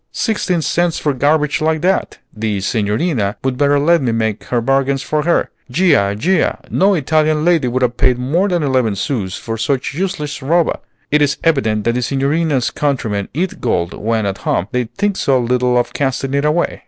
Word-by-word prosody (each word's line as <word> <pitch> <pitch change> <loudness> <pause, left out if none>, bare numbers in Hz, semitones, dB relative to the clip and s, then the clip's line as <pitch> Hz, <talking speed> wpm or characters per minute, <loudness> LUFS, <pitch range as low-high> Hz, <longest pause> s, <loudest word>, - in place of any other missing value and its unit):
"Sixteen 185 -7 -1
cents 175 +1 0
for 145 - 0
garbage 145 +3 +1
like 160 0 +1
that! 190 +2 0 0.2
The 105 -2 -2
Signorina 105 - -1
would 130 -1 0
better 145 +2 +2
let 165 +3 +3
me 125 -3 0
make 110 -2 -2
her 120 - 0
bargains 135 +3 +1
for 155 -1 -1
her. 170 - +1 0.2
Già! 140 - +2
Già! 180 - +1
No 195 +1 +3
Italian 155 0 +1
lady 170 -7 +3
would 130 +1 0
have 120 -1 0
paid 125 -1 +3
more 155 +10 0
than 175 -3 0
eleven 130 -6 +1
sous 100 -3 -3
for 115 -1 -5
such 130 +5 -1
useless 155 -4 -3
roba. 165 +5 +1 0.3
It 150 0 +3
is 145 -2 +2
evident 110 -10 +1
that 115 - +1
the 125 - -1
Signorina's 140 +1 0
countrymen 115 -9 -2
eat 180 +4 -2
gold 85 -8 0
when 110 0 -1
at 100 -1 -3
home, 90 - -1
they 125 -1 0
think 200 - -2
so 135 -2 +2
little 125 0 +1
of 120 0 0
casting 135 -1 -1
it 140 +1 +1
away!" 155 +3 0
135 Hz, 190 wpm, -17 LUFS, 115-155 Hz, 0.3 s, let